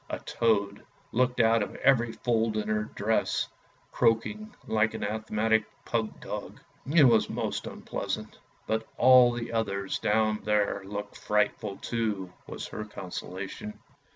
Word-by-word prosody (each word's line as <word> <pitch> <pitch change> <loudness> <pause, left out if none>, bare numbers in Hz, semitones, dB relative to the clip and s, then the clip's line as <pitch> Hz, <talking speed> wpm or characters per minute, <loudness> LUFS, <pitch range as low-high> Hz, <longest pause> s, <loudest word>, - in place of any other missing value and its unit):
A - - -2
toad 100 -3 0 0.3
looked 125 +1 +1
out 115 -1 +5
of 100 - -3
every 120 -4 +3
fold 115 -2 0
in 105 0 -2
her 105 0 +1
dress, 110 +2 +1 0.4
croaking 170 - +1
like 110 0 +1
an - - -4
asthmatic 110 +1 +1 0.2
pug 110 -2 -2
dog. - - -6 0.3
It 155 -1 +7
was 115 -4 +5
most - - -3
unpleasant. - - -5
" - - -35
But 110 0 -1
all 125 -1 +7
the 120 -1 -5
others 100 -3 -1
down 110 0 +2
here 105 -1 +1
look 100 +1 -6
frightful 105 -1 0
too," 105 -6 -2
was - - -6
her 110 - -5
consolation. 95 +1 -7
110 Hz, 140 wpm, -28 LUFS, 105-115 Hz, 0.4 s, It